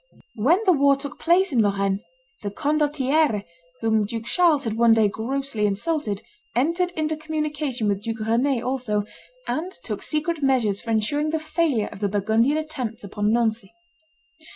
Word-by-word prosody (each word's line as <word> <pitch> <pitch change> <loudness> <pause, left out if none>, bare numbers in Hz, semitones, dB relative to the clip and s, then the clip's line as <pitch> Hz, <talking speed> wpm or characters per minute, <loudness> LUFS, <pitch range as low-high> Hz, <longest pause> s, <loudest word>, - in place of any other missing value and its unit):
When 290 - +4
the 375 - +6
war 280 -3 +4
took 280 +1 -8
place 360 +2 +3
in 245 -4 +3
Lorraine, 200 -1 +1 0.4
the 205 - -3
condottiere, 290 -2 +1 0.4
whom 220 -2 +2
Duke 225 +1 -5
Charles 330 -4 +3
had 225 - -2
one 230 0 +5
day 220 -2 +4
grossly 230 +1 -1
insulted, 210 0 -2 0.3
entered 335 +8 +1
into 310 0 0
communication 300 -6 -2
with 200 -1 0
Duke 225 0 -4
Rend 235 +3 +1
also, 245 -5 -1 0.4
and 345 +4 -2
took - - -4
secret 310 +1 -1
measures 245 -7 +2
for 230 - -9
insuring 230 +8 +1
the 320 +1 0
failure 310 -8 0
of - - -10
the 205 -1 0
Burgundian 220 +8 +2
attempts 260 -9 -4
upon 205 +1 -1
Nancy. 225 -3 0
250 Hz, 155 wpm, -24 LUFS, 215-305 Hz, 0.4 s, the